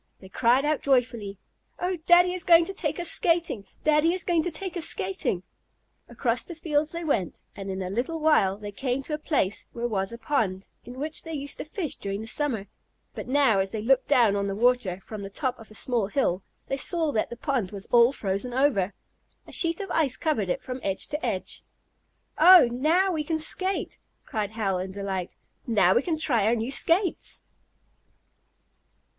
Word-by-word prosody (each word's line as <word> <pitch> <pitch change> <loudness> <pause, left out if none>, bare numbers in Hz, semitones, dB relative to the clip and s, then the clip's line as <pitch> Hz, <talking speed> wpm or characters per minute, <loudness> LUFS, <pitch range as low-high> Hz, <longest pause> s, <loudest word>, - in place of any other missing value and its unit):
They 190 - -14
cried 245 +7 +2
out 300 -1 0
joyfully: 240 -7 0 0.4
"Oh, 365 +1 -1
Daddy 355 +1 +6
is 365 - -1
going 335 -1 +6
to 390 - -4
take - - -2
us 345 -1 0
skating! 335 - +1 0.2
Daddy 305 +2 +3
is 370 - +2
going 340 -2 +2
to 355 - -2
take 370 +2 -3
us 340 -2 +1
skating!" 185 - 0 0.7
Across - - -1
the 345 - -8
fields 305 -1 -1
they 340 0 -5
went, 200 - -2
and 195 -1 -7
in 190 0 -3
a 180 - -4
little 260 +10 -2
while 300 -12 +3
they 205 -1 -7
came 255 +5 -2
to 300 - -6
a 300 - -2
place 260 - -1
where 240 0 -2
was 195 -3 -2
a 235 - -7
pond, 220 -7 -1 0.2
in 245 +1 -10
which 305 +2 -3
they 325 - -8
used 285 0 -5
to - - -5
fish 315 -1 -4
during 200 +1 -4
the - - -7
summer. 230 -4 -1 0.5
But - - -7
now 260 -6 +3
as 190 0 -1
they 215 -1 -3
looked 265 +2 +2
down 240 -8 +4
on 200 0 -1
the 195 - -3
water, 230 -5 +1
from 215 +1 -8
the 195 - -6
top 255 +4 -3
of 225 - -13
a 215 - -13
small 235 -3 0
hill, 205 -6 0 0.2
they 270 - -3
saw 325 +1 0
that 220 - -1
the 235 - -8
pond 260 -10 -1
was 200 0 -8
all 240 +1 +6
frozen 210 +1 -3
over. 235 -9 +1 0.5
A - - -13
sheet 335 -1 +1
of 390 -3 -5
ice 285 -6 +1
covered 260 - -1
it - - -2
from 255 0 -6
edge 195 -1 -1
to 300 +2 -4
edge. - - -3 0.8
"Oh, 355 -3 +9
now 325 +10 +2
we 315 -3 -1
can 320 +1 -1
skate!" 375 +5 -2 0.3
cried 210 -2 -3
Hal 205 -4 -1
in 190 +1 -5
delight, 190 -2 -4 0.3
"Now 205 -6 +4
we - - +3
can 320 +2 -2
try 240 -10 +1
our 230 - +3
new 230 +3 -3
skates." 335 +7 +2
255 Hz, 200 wpm, -26 LUFS, 205-315 Hz, 0.8 s, Oh